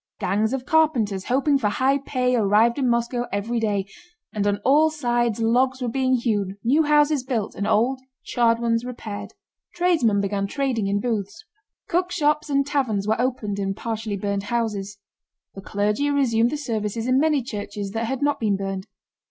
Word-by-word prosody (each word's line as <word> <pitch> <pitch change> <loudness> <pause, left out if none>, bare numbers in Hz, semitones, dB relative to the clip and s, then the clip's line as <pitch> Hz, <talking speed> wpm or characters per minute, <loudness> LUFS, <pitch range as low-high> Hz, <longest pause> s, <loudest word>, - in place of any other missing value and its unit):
Gangs 210 +4 0
of 265 -1 -3
carpenters 245 -13 +1
hoping 275 +2 +2
for 210 -5 +1
high 265 +6 +1
pay 255 -2 0
arrived 225 +3 +3
in 260 -3 +1
Moscow 240 +1 0
every 220 +4 -1
day, 205 -3 0 0.5
and 205 -2 -1
on 205 0 +1
all 300 +4 +5
sides 240 -7 0
logs 255 +3 +2
were 250 - -2
being 260 +1 +1
hewn, 205 -5 -1
new 270 +7 +3
houses 295 -2 +3
built, 235 -5 -2
and 200 - -3
old, 255 +5 +2 0.2
charred 230 -2 +2
ones 230 0 0
repaired. 215 -4 -7 0.4
Tradesmen 325 - +2
began 200 0 -1
trading 250 -4 -1
in 200 +1 +1
booths. 210 -4 -3 0.4
Cookshops 315 -4 0
and 275 -1 +2
taverns 235 -9 -1
were 220 +2 +1
opened 225 -6 -2
in 195 -1 -2
partially 220 -2 -4
burned 200 0 -2
houses. 210 -4 -2 0.6
The 195 - -9
clergy 210 +8 0
resumed 240 -5 +2
the 300 - -3
services 225 -4 -3
in 255 +1 +3
many 300 -3 +2
churches 205 -3 -5
that 225 +2 -2
had 265 +4 -3
not 290 0 +1
been 210 -3 +1
burned. 195 -1 -4
235 Hz, 170 wpm, -23 LUFS, 205-265 Hz, 0.6 s, all